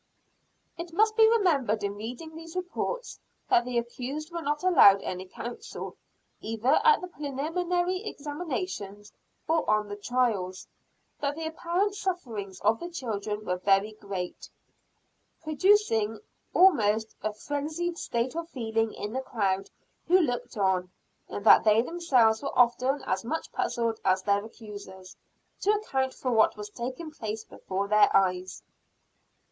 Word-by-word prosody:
It 340 Hz, 0 st, -6 dB
must 435 Hz, +4 st, +3 dB
be 445 Hz, -1 st, +7 dB
remembered 290 Hz, -, +2 dB
in 200 Hz, 0 st, -1 dB
reading 245 Hz, +10 st, -7 dB
these 325 Hz, +1 st, -10 dB
reports, 370 Hz, +7 st, -4 dB, 0.3 s
that 240 Hz, -, +5 dB
the 250 Hz, -1 st, -2 dB
accused 260 Hz, +7 st, -4 dB
were 340 Hz, 0 st, -4 dB
not 295 Hz, +2 st, -2 dB
allowed 200 Hz, -, +7 dB
any 185 Hz, +1 st, -5 dB
counsel, 240 Hz, +5 st, -7 dB, 0.4 s
either 225 Hz, +4 st, +1 dB
at 455 Hz, -1 st, +5 dB
the 365 Hz, -, -5 dB
preliminary 350 Hz, +5 st, -2 dB
examinations, 290 Hz, -, -5 dB, 0.3 s
or 320 Hz, -5 st, +1 dB
on 215 Hz, -1 st, +2 dB
the 205 Hz, -, -4 dB
trials; 205 Hz, -5 st, -1 dB, 0.5 s
that 285 Hz, 0 st, -1 dB
the 325 Hz, 0 st, -5 dB
apparent 345 Hz, +5 st, -1 dB
sufferings 240 Hz, -, -4 dB
of 225 Hz, +1 st, +3 dB
the 345 Hz, -, -6 dB
children 215 Hz, -, -4 dB
were 180 Hz, -, -1 dB
very 195 Hz, +3 st, +3 dB
great, 195 Hz, -4 st, -6 dB, 0.9 s
producing 305 Hz, -, +2 dB, 0.3 s
almost 225 Hz, -, +4 dB
a 215 Hz, -, -1 dB
frenzied 305 Hz, +9 st, -3 dB
state 235 Hz, +4 st, -2 dB
of 335 Hz, 0 st, -4 dB
feeling 225 Hz, -5 st, -1 dB
in 210 Hz, +2 st, -5 dB
the 260 Hz, -, -1 dB
crowd 195 Hz, -6 st, -1 dB, 0.4 s
who 365 Hz, +2 st, +6 dB
looked 245 Hz, -7 st, -2 dB
on; 190 Hz, -2 st, +1 dB, 0.4 s
and 205 Hz, -, -6 dB
that -, -, +8 dB
they 220 Hz, +1 st, +5 dB
themselves 250 Hz, -9 st, +2 dB
were 280 Hz, -, -4 dB
often 255 Hz, +3 st, +3 dB
as 190 Hz, -, -1 dB
much 320 Hz, +8 st, -4 dB
puzzled 230 Hz, -2 st, -1 dB
as 185 Hz, 0 st, +2 dB
their 200 Hz, 0 st, +2 dB
accusers, 205 Hz, -4 st, -11 dB, 0.4 s
to 400 Hz, -, -1 dB
account 270 Hz, -12 st, 0 dB
for 255 Hz, -, -2 dB
what 220 Hz, -2 st, +3 dB
was 210 Hz, 0 st, -7 dB
taking 255 Hz, +8 st, -5 dB
place 220 Hz, -6 st, -5 dB
before 195 Hz, +1 st, -4 dB
their 210 Hz, +1 st, +5 dB
eyes. 185 Hz, -1 st, -1 dB
245 Hz, 140 wpm, -28 LUFS, 210-330 Hz, 0.9 s, that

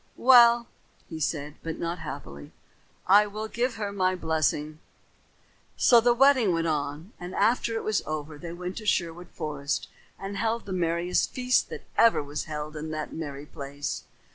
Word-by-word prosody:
"Well," 240 Hz, -2 st, +7 dB, 0.4 s
he 160 Hz, -, -7 dB
said, 150 Hz, -1 st, -3 dB
but 160 Hz, -1 st, -5 dB
not 170 Hz, +1 st, -3 dB
happily, 130 Hz, -, -8 dB, 0.5 s
"I 205 Hz, +3 st, +6 dB
will 215 Hz, +2 st, -5 dB
give 240 Hz, +2 st, -1 dB
her 205 Hz, -2 st, -3 dB
my 185 Hz, -2 st, +1 dB
blessing." 155 Hz, -2 st, -1 dB, 1.0 s
So 235 Hz, -2 st, +6 dB
the 240 Hz, +1 st, +3 dB
wedding 260 Hz, -6 st, +5 dB
went 165 Hz, 0 st, 0 dB
on; 150 Hz, +4 st, -3 dB
and 180 Hz, +1 st, -7 dB
after 230 Hz, 0 st, +2 dB
it 225 Hz, -, -2 dB
was 215 Hz, -2 st, 0 dB
over 150 Hz, -1 st, -5 dB
they 170 Hz, 0 st, -7 dB
went 180 Hz, +1 st, -6 dB
to 215 Hz, -2 st, -6 dB
Sherwood 175 Hz, -1 st, -1 dB
Forest 145 Hz, -3 st, -3 dB, 0.3 s
and 195 Hz, +1 st, -6 dB
held 225 Hz, +2 st, -1 dB
the 195 Hz, -, -5 dB
merriest 175 Hz, 0 st, 0 dB
feast 250 Hz, 0 st, +1 dB
that -, -, -7 dB, 0.2 s
ever 230 Hz, -9 st, +5 dB
was 145 Hz, +1 st, -5 dB
held 150 Hz, 0 st, -5 dB
in 155 Hz, +1 st, -5 dB
that 155 Hz, -1 st, -5 dB
merry 145 Hz, -3 st, -6 dB
place. 145 Hz, -1 st, -6 dB
170 Hz, 165 wpm, -27 LUFS, 150-215 Hz, 1.0 s, Well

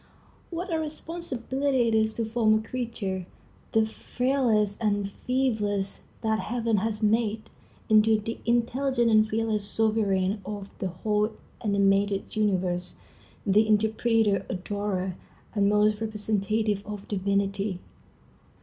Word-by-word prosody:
What 350 Hz, +1 st, -4 dB
a 320 Hz, -, +1 dB
responsibility 285 Hz, -5 st, -1 dB
it 225 Hz, -, +1 dB
is 220 Hz, 0 st, +2 dB
to 230 Hz, -, -1 dB
form 220 Hz, -1 st, +3 dB
a 220 Hz, +1 st, -6 dB
creature, 225 Hz, -8 st, -3 dB, 0.5 s
the 220 Hz, 0 st, +4 dB
frailest 225 Hz, -3 st, 0 dB
and 205 Hz, -2 st, +1 dB
feeblest 210 Hz, -4 st, -1 dB, 0.2 s
that 220 Hz, 0 st, +1 dB
heaven 230 Hz, -1 st, 0 dB
has 215 Hz, +1 st, -1 dB
made, 215 Hz, 0 st, +1 dB, 0.4 s
into 220 Hz, 0 st, +5 dB
the 225 Hz, +2 st, -5 dB
intelligent 240 Hz, +1 st, +2 dB
and 215 Hz, 0 st, +5 dB
fearless 220 Hz, -1 st, 0 dB
sovereign 205 Hz, -2 st, +1 dB
of 205 Hz, 0 st, -6 dB
the 190 Hz, -, -1 dB
whole 210 Hz, +4 st, 0 dB, 0.3 s
animated 200 Hz, -1 st, +1 dB
universe, 185 Hz, -4 st, 0 dB, 0.5 s
the 210 Hz, +2 st, +4 dB
interpreter, 220 Hz, -1 st, +2 dB
adorer, 190 Hz, -1 st, -2 dB, 0.4 s
and 200 Hz, -1 st, +3 dB
almost 210 Hz, +1 st, +3 dB
representative 210 Hz, -1 st, 0 dB
of 205 Hz, -1 st, -7 dB
Divinity! 200 Hz, 0 st, 0 dB
215 Hz, 115 wpm, -27 LUFS, 200-230 Hz, 0.5 s, into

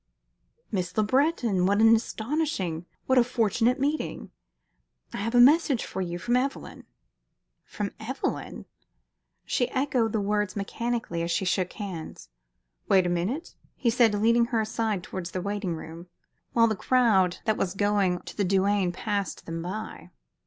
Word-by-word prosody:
"Miss 180 Hz, -2 st, -3 dB
Le 215 Hz, -, +4 dB
Breton! 240 Hz, -, +2 dB
What 200 Hz, +1 st, +2 dB
an 225 Hz, +1 st, +7 dB
astonishing, 220 Hz, -, -2 dB, 0.2 s
what 260 Hz, -1 st, +4 dB
a -, -, +6 dB
fortunate 240 Hz, +1 st, +1 dB
meeting! 290 Hz, +3 st, -2 dB, 0.8 s
I -, -, -4 dB
have 230 Hz, +4 st, -2 dB
a -, -, +6 dB
message 280 Hz, 0 st, +5 dB
for 190 Hz, -, -5 dB
you 175 Hz, -1 st, -3 dB
from 240 Hz, +7 st, 0 dB
Evelyn." 270 Hz, +2 st, -3 dB, 0.8 s
"From 205 Hz, -1 st, -4 dB
Evelyn?" 255 Hz, +5 st, -4 dB, 0.8 s
She 245 Hz, -1 st, 0 dB
echoed 255 Hz, -4 st, 0 dB
the 220 Hz, -, 0 dB
words 205 Hz, -1 st, -1 dB
mechanically 215 Hz, -3 st, -3 dB
as 170 Hz, -, -2 dB
she 170 Hz, +3 st, 0 dB
shook 185 Hz, 0 st, 0 dB
hands. 185 Hz, -, -7 dB, 0.6 s
"Wait 190 Hz, -2 st, +5 dB
a -, -, +1 dB
moment," 190 Hz, -, -2 dB, 0.2 s
he 240 Hz, -3 st, +1 dB
said, 225 Hz, -3 st, +4 dB
leading 230 Hz, +3 st, +3 dB
her 230 Hz, -2 st, 0 dB
aside 215 Hz, -3 st, -2 dB
towards 185 Hz, -1 st, -6 dB
the 185 Hz, -, -4 dB
waiting 200 Hz, -3 st, -2 dB
room, 165 Hz, +2 st, -9 dB, 0.5 s
while 230 Hz, -1 st, +5 dB
the 220 Hz, -1 st, +1 dB
crowd 200 Hz, -7 st, +3 dB
that 220 Hz, -2 st, +2 dB
was 190 Hz, -1 st, -2 dB
going 200 Hz, -3 st, +1 dB
to -, -, -10 dB
the 205 Hz, -, 0 dB
douane 195 Hz, 0 st, +2 dB
passed 200 Hz, 0 st, -3 dB
them 165 Hz, 0 st, -4 dB
by. 190 Hz, +6 st, -6 dB
210 Hz, 155 wpm, -27 LUFS, 185-240 Hz, 0.8 s, an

